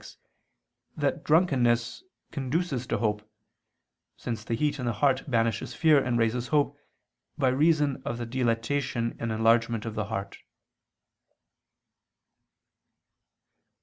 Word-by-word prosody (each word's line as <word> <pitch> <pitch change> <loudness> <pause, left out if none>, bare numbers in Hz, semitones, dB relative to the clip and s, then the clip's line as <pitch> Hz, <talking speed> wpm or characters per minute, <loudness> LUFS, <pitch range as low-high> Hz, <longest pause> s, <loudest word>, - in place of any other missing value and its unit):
6) - - -13 0.8
that - - -1
drunkenness 130 - +2 0.3
conduces 135 -2 -2
to - - 0
hope, 105 -2 0 1.0
since 115 -3 -5
the 115 - -2
heat 145 +3 -1
in 125 - -3
the 120 - 0
heart 135 +5 +1
banishes 115 -2 0
fear 155 -4 +4
and 120 -2 0
raises 120 +2 0
hope, 145 0 +1 0.6
by 130 - +2
reason 145 0 +2
of 120 - -3
the 120 - -4
dilatation 115 0 -1
and 115 -1 -2
enlargement 115 0 +2
of 115 - -4
the 105 -1 -2
heart. 100 -2 -5
120 Hz, 115 wpm, -27 LUFS, 115-140 Hz, 1.0 s, fear